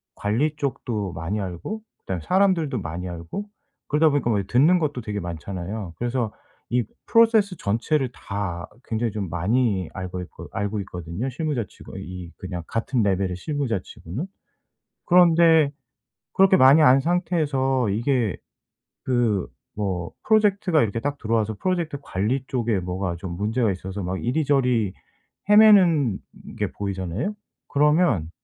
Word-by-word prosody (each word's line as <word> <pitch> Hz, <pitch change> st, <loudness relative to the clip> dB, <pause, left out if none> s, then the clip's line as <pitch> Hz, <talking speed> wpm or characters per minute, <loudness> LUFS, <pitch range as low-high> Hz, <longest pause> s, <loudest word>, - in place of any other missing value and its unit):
관리 125 Hz, +10 st, 0 dB
쪽도 115 Hz, -8 st, -2 dB
많이 85 Hz, +7 st, -3 dB
알고 95 Hz, -, -5 dB, 0.2 s
그다음에 90 Hz, -4 st, -4 dB
사람들도 180 Hz, -, +2 dB
많이 85 Hz, +2 st, -5 dB
알고 85 Hz, -, -6 dB, 0.5 s
그러다 155 Hz, +2 st, +4 dB
보니까 140 Hz, -4 st, 0 dB
뭐 105 Hz, -, +2 dB
이 95 Hz, -, -10 dB
듣는 150 Hz, -, +4 dB
것도 145 Hz, -6 st, -2 dB
되게 105 Hz, -2 st, -4 dB
많잖아요. 90 Hz, +3 st, -5 dB
그래서 120 Hz, -2 st, -1 dB, 0.4 s
이 120 Hz, 0 st, +2 dB, 0.2 s
프로세스 220 Hz, -5 st, +4 dB
전체를 125 Hz, +6 st, 0 dB
다 95 Hz, -4 st, -4 dB, 0.2 s
굉장히 115 Hz, 0 st, -1 dB
좀 100 Hz, -3 st, -4 dB
많이 100 Hz, +1 st, +1 dB
알고 95 Hz, -1 st, -5 dB
있고 90 Hz, -, -10 dB
알고 100 Hz, +1 st, -2 dB
있거든요 90 Hz, +6 st, -5 dB
실무자 145 Hz, -3 st, -2 dB
치고 -, -, -12 dB
이 90 Hz, -1 st, -8 dB
그냥 90 Hz, -3 st, -6 dB
같은 115 Hz, +1 st, 0 dB
레벨의 95 Hz, -2 st, 0 dB
실무자 135 Hz, -1 st, -2 dB
치고는. 105 Hz, -, -7 dB, 0.8 s
그런데 165 Hz, -4 st, +5 dB, 0.6 s
그렇게 190 Hz, 0 st, +6 dB
많이 135 Hz, +4 st, +7 dB
아는 130 Hz, -1 st, +6 dB
상태에서 145 Hz, -, +1 dB
이게 115 Hz, 0 st, 0 dB, 0.7 s
그 120 Hz, -7 st, +1 dB, 0.3 s
뭐 95 Hz, -4 st, -2 dB, 0.2 s
프로젝트가 200 Hz, -6 st, +3 dB
이렇게 115 Hz, 0 st, -1 dB
딱 145 Hz, +3 st, -2 dB
들어와서 110 Hz, -2 st, 0 dB
프로젝트 175 Hz, -5 st, -1 dB
관리 120 Hz, +8 st, -1 dB
쪽에 115 Hz, -6 st, 0 dB
뭐가 90 Hz, -1 st, -3 dB
좀 85 Hz, 0 st, -6 dB
문제가 110 Hz, +4 st, +1 dB
있어서 95 Hz, +2 st, -6 dB
막 90 Hz, +1 st, -3 dB
이리저리 125 Hz, -6 st, +1 dB, 0.6 s
헤매는 185 Hz, -, +6 dB, 0.4 s
게 -, -, -1 dB
보이잖아요? 100 Hz, -, -3 dB, 0.3 s
그러면 145 Hz, -, +2 dB
115 Hz, 315 characters per minute, -24 LUFS, 95-150 Hz, 0.8 s, 많이